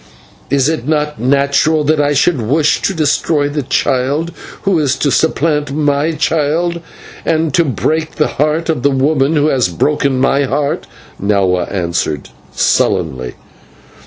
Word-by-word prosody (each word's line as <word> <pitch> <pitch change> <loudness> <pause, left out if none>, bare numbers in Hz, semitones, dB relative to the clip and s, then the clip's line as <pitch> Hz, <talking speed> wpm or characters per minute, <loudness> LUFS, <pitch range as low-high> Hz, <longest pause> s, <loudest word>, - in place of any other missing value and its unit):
"Is 140 0 +2
it 155 -5 -2
not 150 -1 -1
natural 140 +4 +2
that 150 +1 +2
I 145 0 +1
should 145 -2 +2
wish 145 +7 +1
to 195 - -1
destroy 150 -1 +1
the 145 +1 -2
child 140 +5 0 0.3
who 195 -4 +2
is 140 -3 +1
to 140 +1 0
supplant 150 -1 +1
my 145 +2 0
child, 160 +3 0 0.4
and 160 -2 0
to 170 - +4
break 155 +4 -1
the 150 - +2 0.2
heart 155 +2 +1
of 160 -6 -1
the 140 - +3
woman 140 +2 +1
who 145 -1 +2
has 130 -7 +2
broken 140 - 0
my 140 +1 +2
heart?" 140 +2 -2 0.3
Nahua 95 -3 +1
answered, 85 -6 -2 0.2
sullenly. 65 -7 0
145 Hz, 145 wpm, -15 LUFS, 130-155 Hz, 0.4 s, to